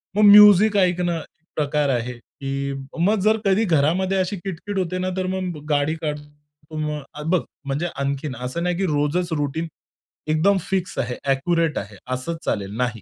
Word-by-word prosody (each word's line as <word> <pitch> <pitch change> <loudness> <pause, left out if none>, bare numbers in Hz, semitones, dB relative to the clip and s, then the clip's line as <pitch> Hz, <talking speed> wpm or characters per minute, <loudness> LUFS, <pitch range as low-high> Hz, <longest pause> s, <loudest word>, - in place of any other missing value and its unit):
मग 210 - +3
म्युझिक 210 0 +8
ऐकणं, 180 -2 +2
एक 160 0 -12
प्रकार 150 -1 0
आहे, 125 -1 -1
की 135 +3 -5 0.3
मग 205 +5 +3
जर 215 +2 +3
कधी 195 +3 +3
घरामध्ये 175 +4 +2
अशी 185 +2 -1
किटकिट 195 +2 -5
होते 185 0 -2
ना 185 0 -1
तर 185 - -1
मग 175 -5 -4
गाडी 145 +2 +1
काढतो. 150 -2 -4 0.5
मग 150 -1 -5
बघ 185 0 +3 0.2
म्हणजे 140 +5 -1
आणखीन 140 0 -2
असं 130 +7 -3
नाही, 180 0 0
की 195 - 0
रोजच 155 +3 0
रुटीन 150 +3 -2 0.6
एकदम 160 +6 +3
फिक्स 190 -2 -2
आहे, 125 -1 -2 0.2
एक्युरेट 165 +3 +1
आहे. 100 0 -5 0.2
असंच 165 +6 -3
चालेल 100 0 -2
नाही. 120 -4 -1
160 Hz, 165 wpm, -22 LUFS, 140-185 Hz, 0.6 s, म्युझिक